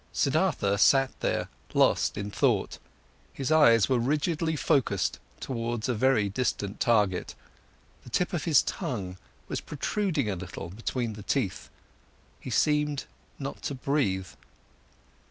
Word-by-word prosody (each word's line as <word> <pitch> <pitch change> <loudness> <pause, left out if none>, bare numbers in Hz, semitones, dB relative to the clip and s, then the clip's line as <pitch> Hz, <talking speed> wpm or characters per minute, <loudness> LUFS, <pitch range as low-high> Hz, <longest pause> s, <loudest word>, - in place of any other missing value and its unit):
Siddhartha 100 0 +1
sat 135 +3 +5
there - - -1 0.3
lost - - +3
in 100 0 -4
thought, - - +1 0.5
his 135 +2 -3
eyes 115 -9 +6
were 130 -2 +2
rigidly 155 +5 0
focused 125 - +1 0.2
towards 120 -2 -3
a 125 - +1
very 115 -2 +2
distant 105 -1 -2
target, 105 -7 +1 0.7
the - - -12
tip 180 +10 0
of 165 -4 -2
his 155 -6 +5
tongue 105 - -4 0.3
was - - -3
protruding 155 - -1
a 100 - -1
little 90 -2 -7
between 115 +2 -3
the 105 - -9
teeth, 105 -3 -2 0.7
he - - -8
seemed 150 -1 +1 0.3
not 135 -1 -6
to 140 - -3
breathe. 120 - 0
125 Hz, 130 wpm, -28 LUFS, 105-145 Hz, 0.7 s, eyes